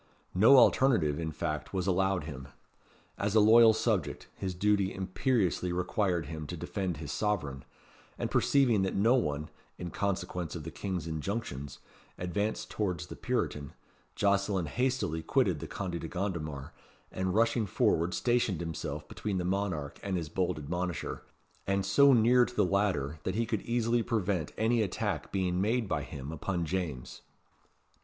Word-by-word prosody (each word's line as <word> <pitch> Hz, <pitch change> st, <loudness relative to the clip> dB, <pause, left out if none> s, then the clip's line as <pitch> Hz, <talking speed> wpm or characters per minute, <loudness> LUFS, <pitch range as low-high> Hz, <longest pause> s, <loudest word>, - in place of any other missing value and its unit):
No 110 Hz, +9 st, +7 dB
alternative, 115 Hz, -, +4 dB
in 80 Hz, -1 st, -2 dB
fact, 75 Hz, +2 st, -4 dB
was 90 Hz, -2 st, 0 dB
allowed 95 Hz, -2 st, +1 dB
him. 70 Hz, -4 st, -7 dB, 0.7 s
As 100 Hz, +1 st, 0 dB
a -, -, +7 dB
loyal 110 Hz, +2 st, +8 dB
subject, 105 Hz, -9 st, -1 dB
his 95 Hz, -2 st, -4 dB
duty 100 Hz, 0 st, +2 dB
imperiously 95 Hz, -1 st, 0 dB
required 90 Hz, -1 st, 0 dB
him 80 Hz, -2 st, -6 dB
to -, -, -5 dB
defend 95 Hz, -5 st, -3 dB
his 75 Hz, -1 st, -6 dB
sovereign; 75 Hz, -11 st, -1 dB, 0.5 s
and -, -, -3 dB
perceiving 125 Hz, -7 st, +3 dB
that 95 Hz, -, -1 dB
no 115 Hz, +5 st, +4 dB
one 75 Hz, -, -1 dB, 0.3 s
(in 85 Hz, -1 st, -6 dB
consequence 90 Hz, -4 st, -2 dB
of 80 Hz, -, -6 dB
the 80 Hz, -, -6 dB
King's 95 Hz, -5 st, -4 dB
injunctions) 80 Hz, -, -4 dB, 0.4 s
advanced 100 Hz, +5 st, -2 dB
towards 90 Hz, -6 st, -2 dB
the -, -, -9 dB
Puritan, 70 Hz, -2 st, -2 dB, 0.4 s
Jocelyn 100 Hz, -2 st, +1 dB
hastily 125 Hz, -, -1 dB
quitted -, -, +1 dB
the -, -, -6 dB
Conde 90 Hz, -3 st, -4 dB
de -, -, -4 dB
Gondomar, 80 Hz, -7 st, -4 dB, 0.4 s
and 95 Hz, 0 st, -2 dB
rushing 115 Hz, -1 st, +2 dB
forward 85 Hz, -1 st, +1 dB
stationed 120 Hz, -7 st, +1 dB
himself 85 Hz, -2 st, -5 dB
between 100 Hz, -3 st, -3 dB
the 90 Hz, -, -1 dB
monarch 90 Hz, -7 st, -2 dB
and 95 Hz, -2 st, -2 dB
his 80 Hz, -3 st, -4 dB
bold 90 Hz, 0 st, -1 dB
admonisher; 90 Hz, +3 st, -3 dB, 0.5 s
and 100 Hz, 0 st, +1 dB
so 140 Hz, +9 st, +6 dB
near 125 Hz, +1 st, +5 dB
to 125 Hz, -, -10 dB
the 105 Hz, -, +3 dB
latter, 90 Hz, -7 st, 0 dB
that 95 Hz, -, -3 dB
he 115 Hz, +1 st, +1 dB
could 110 Hz, -2 st, -2 dB
easily 120 Hz, 0 st, +1 dB
prevent 100 Hz, -8 st, -1 dB
any 115 Hz, +1 st, +2 dB
attack 100 Hz, -, -2 dB
being 90 Hz, -2 st, 0 dB
made 115 Hz, +2 st, +1 dB
by -, -, -1 dB
him 70 Hz, +1 st, -7 dB
upon 85 Hz, +2 st, -2 dB
James. 80 Hz, -7 st, -4 dB
95 Hz, 155 wpm, -30 LUFS, 80-105 Hz, 0.7 s, loyal